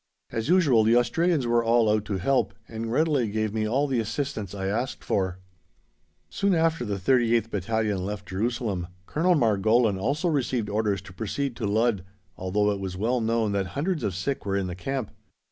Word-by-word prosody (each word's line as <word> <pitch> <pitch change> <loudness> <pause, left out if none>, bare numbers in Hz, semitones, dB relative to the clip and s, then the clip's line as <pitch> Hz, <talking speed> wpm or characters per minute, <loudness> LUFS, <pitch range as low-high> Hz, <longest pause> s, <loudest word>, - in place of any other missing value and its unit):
As 115 +5 -3
usual, 150 -11 +5
the 115 +2 +4
Australians 145 +5 +2
were 120 0 +2
all 115 0 +3
out 105 0 +2
to 100 -3 -2
help, 100 -2 +1
and 115 0 -5
readily 145 -4 +2
gave 110 0 -1
me 110 -1 0
all 135 +6 +1
the 135 -4 0
assistance 110 -3 -3
I 95 -1 -4
asked 115 +7 -2
for. 95 -2 -1 0.9
Soon 200 -2 +1
after 165 -4 +1
the 105 -3 -2
38th 115 +2 +2
Battalion 105 -1 -1
left 100 -1 -5
Jerusalem, 100 -2 -2 0.2
Colonel 175 - +2
Margolin 110 -3 +3
also 145 - 0
received 130 -8 0
orders 105 -3 0
to 90 - -12
proceed 120 +6 -3
to 110 - -2
Ludd, 110 -2 +1 0.3
although 105 +3 0
it 100 - -3
was 95 -1 -5
well 120 +5 0
known 115 -1 +1
that 100 -1 0
hundreds 160 -1 -1
of 95 - -1
sick 135 +10 -2
were 100 0 -1
in 100 - -1
the 90 - -4
camp. 130 +5 -3
110 Hz, 185 wpm, -26 LUFS, 100-130 Hz, 0.9 s, usual